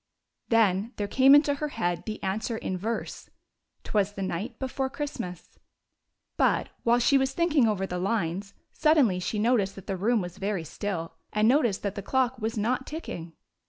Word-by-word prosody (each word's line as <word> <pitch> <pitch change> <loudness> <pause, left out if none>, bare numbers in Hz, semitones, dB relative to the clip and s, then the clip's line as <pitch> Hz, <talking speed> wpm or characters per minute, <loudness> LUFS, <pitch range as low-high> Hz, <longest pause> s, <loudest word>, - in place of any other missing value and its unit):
Then 220 0 +2
there 205 - -2
came 265 +6 +6
into 290 0 +5
her 300 +2 -3
head 175 - -2
the 215 - -5
answer 215 +4 -2
in 190 - -3
verse: 220 +5 -4 0.3
" - - -50
'T - - -10
was 205 -1 +2
the 195 - -4
night 190 +6 -4
before 265 0 -2
Christmas." 265 - -6 0.8
But, - - +2
while 235 +1 +3
she 270 +3 +4
was 265 0 0
thinking 315 -7 +3
over 200 -3 0
the 180 -1 -4
lines, 195 -1 -2 0.2
suddenly 290 - +3
she 195 +4 -2
noticed 210 -3 +2
that 195 - -11
the 195 - -2
room 225 +5 +2
was 180 0 -6
very 195 -3 -1
still, 165 0 -4 0.2
and 215 +1 +2
noticed 240 -6 +2
that 200 -2 -1
the 200 - -5
clock 260 +3 0
was 220 0 -2
not 250 +5 0
ticking. 175 - -6
215 Hz, 185 wpm, -27 LUFS, 190-260 Hz, 0.8 s, came